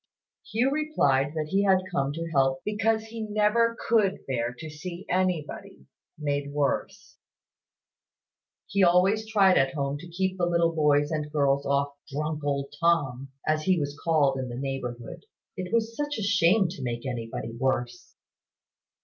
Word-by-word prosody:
Hugh 245 +5 +2
replied 145 - +1
that 155 -1 -2
he 195 +4 +2
had 190 -2 +4
come 140 -6 0
to 165 +2 -4
help 135 -2 +2
because 220 +1 +1
he 225 0 -8
never 215 +2 +2
could 210 -4 +2
bear 120 -3 -1
to 160 - -7
see 170 +4 -8
anybody 180 - -2 0.3
made 145 -1 -2
worse. 145 -1 -2 1.5
He 200 0 +1
always 190 +5 +3
tried 195 -4 +5
at 135 +1 +1
home 140 0 -2
to 175 - -10
keep 190 +2 -2
the 175 - +2
little 170 -1 +2
boys 145 -1 +2
and 150 -1 -3
girls 140 -2 +1
off 140 0 +1 0.2
"drunk 150 +1 -3
old 140 -1 -2
Tom," 140 -6 +1 0.2
as 155 0 +2
he 185 -2 +3
was 145 -1 -3
called 145 -5 +2
in 130 -1 -4
the 120 - -6
neighbourhood. 135 +3 -5 0.3
It 185 -2 -5
was 230 0 0
such 290 +1 -2
a 215 - -3
shame 200 0 +4
to 165 -5 -8
make 120 -1 -4
anybody 115 -3 -4
worse! 125 -1 -2
155 Hz, 160 wpm, -27 LUFS, 140-190 Hz, 1.5 s, tried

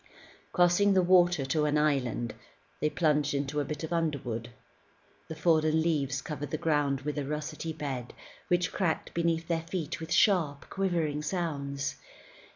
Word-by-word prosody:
Crossing 180 +3 +4
the 185 - +5
water 175 -5 +4
to 150 +3 +1
an 150 0 +2
island, 135 -6 0 0.5
they 150 - +1
plunged 150 -3 +1
into 140 +1 -1
a - - +1
bit 150 +2 -5
of 160 - -3
underwood. 130 -8 -2 0.8
The 160 - -6
fallen 155 -1 +3
leaves 140 -5 0
covered 145 -2 -5
the 155 - -2
ground 145 -4 +1
with 150 +1 -3
a - - -2
russety 150 +3 -4
bed 135 -6 -5 0.3
which 175 -1 +1
cracked 175 -5 -1
beneath 165 -1 0
their 165 -1 0
feet 165 -1 -4
with 160 +1 -7
sharp, 175 -6 +3
quivering 170 -6 0
sounds. 145 -4 -3
155 Hz, 155 wpm, -29 LUFS, 145-170 Hz, 0.8 s, the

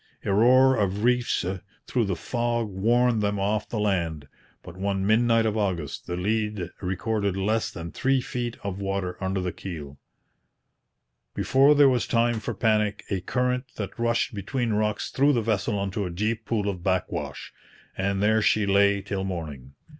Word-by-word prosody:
A 100 - +1
roar 130 +5 +5
of 100 0 0
reefs 125 -6 +2 0.4
through 120 -3 0
the 95 -2 -1
fog 120 +3 -1
warned 115 +4 +2
them 100 -1 0
off 105 +2 -1
the 115 - -3
land; 85 -8 -1 0.4
but - - -10
one 95 0 -1
midnight 115 +1 +3
of 110 -1 0
August 90 -9 -2
the 90 - -3
lead 105 -2 -1
recorded 100 +1 -1
less 110 +3 0
than 85 0 -7
three 135 0 +1
feet 120 -1 -4
of 100 -1 -4
water 95 -2 -2
under 95 +1 -1
the 90 -1 -2
keel. 75 -8 -8 1.4
Before 140 +3 +4
there 145 -1 +7
was 125 -3 +1
time 115 -1 +2
for 110 - -4
panic, 105 -3 +1
a 95 -2 0
current 125 +5 -1
that 105 +2 -6
rushed 115 0 +1
between 115 +3 -2
rocks 105 0 -1
threw 140 +2 +3
the 120 - +1
vessel 105 -1 0
into 100 0 -2
a - - -5
deep 110 +6 -2
pool 105 -3 -1
of 95 -3 -3
backwash; 95 0 -2 0.4
and 100 +1 -1
there 110 +1 +3
she 105 0 +3
lay 100 0 +3
till 100 -1 -3
morning. 75 -8 -6
105 Hz, 170 wpm, -26 LUFS, 95-115 Hz, 1.4 s, there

